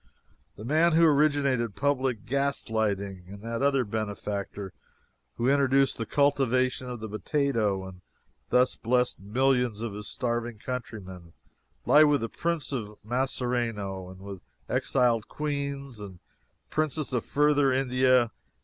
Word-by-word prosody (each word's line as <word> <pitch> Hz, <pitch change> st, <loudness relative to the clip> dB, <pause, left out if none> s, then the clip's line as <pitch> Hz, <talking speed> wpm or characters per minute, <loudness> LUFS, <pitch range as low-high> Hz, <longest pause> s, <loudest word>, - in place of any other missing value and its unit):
The 105 Hz, -, -9 dB
man 160 Hz, +5 st, +3 dB
who 165 Hz, +1 st, +6 dB
originated 140 Hz, -7 st, +2 dB
public 130 Hz, -5 st, 0 dB
gas 140 Hz, -2 st, -1 dB
lighting, 100 Hz, -4 st, -1 dB
and 100 Hz, +2 st, -11 dB
that 115 Hz, +1 st, -3 dB
other 135 Hz, -2 st, +2 dB
benefactor 100 Hz, -2 st, -4 dB, 0.6 s
who 120 Hz, -, -1 dB
introduced 135 Hz, -1 st, +3 dB
the 115 Hz, -, -3 dB
cultivation 130 Hz, -3 st, +1 dB
of 120 Hz, -3 st, -6 dB
the 110 Hz, -, -4 dB
potato 110 Hz, -4 st, 0 dB
and 90 Hz, -1 st, -12 dB, 0.5 s
thus 125 Hz, 0 st, +3 dB
blessed 125 Hz, +1 st, +1 dB
millions 125 Hz, +1 st, +1 dB
of 115 Hz, -2 st, -4 dB
his 105 Hz, +1 st, -6 dB
starving 120 Hz, -2 st, -2 dB
countrymen, 100 Hz, -8 st, -7 dB, 0.5 s
lie 150 Hz, +1 st, +7 dB
with 145 Hz, -2 st, +3 dB
the 115 Hz, -, -2 dB
Prince 165 Hz, -3 st, -2 dB
of 105 Hz, -6 st, -4 dB
Masserano, 115 Hz, -6 st, -2 dB
and 95 Hz, 0 st, -12 dB
with 100 Hz, -2 st, -8 dB, 0.3 s
exiled 115 Hz, -3 st, +1 dB
queens 140 Hz, -4 st, -4 dB
and 100 Hz, -3 st, -9 dB, 0.5 s
princes 155 Hz, -3 st, -1 dB
of 120 Hz, -, 0 dB
Further 145 Hz, -1 st, +3 dB
India. 130 Hz, -2 st, +3 dB
125 Hz, 130 wpm, -27 LUFS, 105-140 Hz, 0.6 s, lie